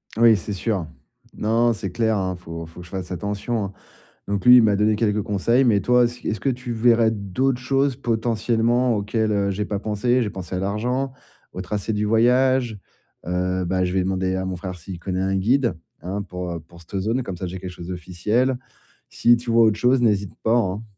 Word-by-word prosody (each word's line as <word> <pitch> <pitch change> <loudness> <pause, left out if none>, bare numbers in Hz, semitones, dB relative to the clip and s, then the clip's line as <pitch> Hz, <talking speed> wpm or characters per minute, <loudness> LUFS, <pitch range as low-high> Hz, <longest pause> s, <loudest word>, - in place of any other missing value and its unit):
Oui, 115 0 +6
c'est 100 +2 -5
sûr. 95 -4 -2 0.5
Non, 115 +3 +2
non, 120 - +3
c'est 100 -3 -5
clair, 110 +1 +1
hein, 95 -1 -1
faut 85 -1 -8
faut 80 +2 -13
que 90 - -9
je - - -15
fasse 95 -2 -5
attention, 100 +4 -2
hein. 100 - -7 0.5
Donc 100 -2 -2
lui, 125 0 +10
il - - +8
m'a 105 -2 +3
donné 105 +1 +2
quelques 105 -2 0
conseils 115 +7 +2
mais 110 -5 +4
toi, 125 +3 +4
est-ce 120 +1 -3
est-ce 110 - -1
que 135 - 0
tu 125 -1 -6
verrais 115 0 +4
d'autres 110 +5 -1
choses 135 0 +1
potentiellement 115 +1 +1
auxquelles, 110 +1 0
heu, 100 -1 +1
j'ai 105 +2 -2
pas 100 -1 -3
pensé? 110 +5 +1
J'ai 110 - -1
pensé 95 -2 -6
à - - -1
l'argent, 125 +7 -1 0.4
au 90 - -6
tracé 105 +3 -3
du 105 0 0
voyage, 120 +1 +3 0.5
heu, 90 +1 -1
bah, 90 +1 0
je 90 - -2
vais 95 - +2
demander 95 0 -1
à 95 0 -2
mon 95 - -3
frère 90 +1 -6
s'il 90 +1 -9
connaît 95 +1 -3
un 95 0 0
guide, 120 +6 +2 0.3
hein, 95 +5 -3
pour, 90 -2 -6
heu, 85 - -4
pour 85 +2 -17
cette 95 +3 -4
zone, 115 +7 -1
comme 95 -5 -6
ça, 95 - -4
j'ai 90 +2 -6
quelque 90 0 -7
chose 85 -1 -10
d'officiel. 95 +9 -1 0.5
Si 120 - +4
tu 120 0 -7
vois 115 0 +5
autre 110 -1 +3
chose, 125 +2 +3
n'hésite 100 -4 +1
pas, 115 +1 +3
hein. 105 -2 0
105 Hz, 220 wpm, -22 LUFS, 95-120 Hz, 0.5 s, lui